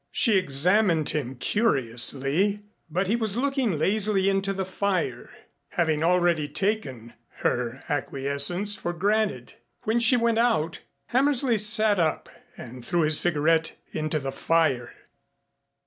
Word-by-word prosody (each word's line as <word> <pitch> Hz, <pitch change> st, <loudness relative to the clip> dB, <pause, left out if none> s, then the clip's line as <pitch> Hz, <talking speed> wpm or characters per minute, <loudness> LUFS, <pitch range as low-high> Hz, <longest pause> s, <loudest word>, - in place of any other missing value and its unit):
She 225 Hz, -4 st, +3 dB
examined 175 Hz, +1 st, +3 dB
him 135 Hz, -4 st, -4 dB
curiously, 140 Hz, -, +1 dB, 0.3 s
but 180 Hz, +5 st, -1 dB
he 205 Hz, +5 st, 0 dB
was 220 Hz, -2 st, -1 dB
looking 265 Hz, -, -1 dB
lazily 195 Hz, +3 st, +1 dB
into 195 Hz, 0 st, -1 dB
the 195 Hz, -1 st, -3 dB
fire, 185 Hz, -10 st, -3 dB, 0.4 s
having 160 Hz, -3 st, -1 dB
already 175 Hz, -3 st, +1 dB
taken 145 Hz, -, -3 dB, 0.3 s
her 125 Hz, +1 st, -2 dB
acquiescence 140 Hz, +8 st, 0 dB
for 175 Hz, -3 st, -5 dB
granted. 200 Hz, -, -1 dB, 0.3 s
When 225 Hz, +2 st, 0 dB
she 235 Hz, +2 st, +3 dB
went 230 Hz, -1 st, +1 dB
out, 220 Hz, -10 st, 0 dB, 0.3 s
Hammersley 260 Hz, -3 st, +2 dB
sat 210 Hz, -1 st, +2 dB
up 160 Hz, -2 st, -1 dB, 0.3 s
and 125 Hz, +1 st, -10 dB
threw 175 Hz, +6 st, -1 dB
his 155 Hz, -1 st, +4 dB
cigarette 160 Hz, -1 st, +2 dB, 0.2 s
into 155 Hz, 0 st, -2 dB
the 135 Hz, -2 st, -4 dB
fire. 135 Hz, -7 st, 0 dB
175 Hz, 125 wpm, -25 LUFS, 145-210 Hz, 0.4 s, his